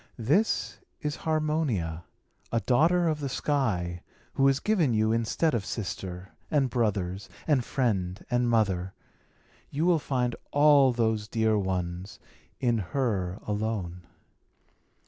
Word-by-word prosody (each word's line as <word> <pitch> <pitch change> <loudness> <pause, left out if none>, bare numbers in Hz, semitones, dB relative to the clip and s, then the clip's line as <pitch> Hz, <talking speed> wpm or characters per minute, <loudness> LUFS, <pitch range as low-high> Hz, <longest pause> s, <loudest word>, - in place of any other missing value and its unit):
This 150 - +1 0.2
is 150 0 -2
Harmonia, 150 - -1 0.5
a 115 - +2
daughter 165 - +3
of 155 -2 0
the 140 -2 -3
sky, 100 - -1 0.3
who 135 - +3
is 135 0 +3
given 170 - +2
you 110 0 +2
instead 115 +8 +1
of 115 -4 0
sister, 95 -3 -5 0.2
and 140 -5 +1
brothers, 100 -5 -1 0.2
and 145 -6 +2
friend, 100 -9 -1
and 120 0 +2
mother. 95 -5 +1 0.7
You 150 +4 -1
will 175 -2 +4
find 125 -4 -1
all 145 -2 +5
those 110 -3 0
dear 110 -1 +1
ones 95 -1 -3 0.4
in 120 -3 +1
her 100 -4 -1
alone." 105 -5 -3
115 Hz, 125 wpm, -28 LUFS, 95-140 Hz, 0.7 s, all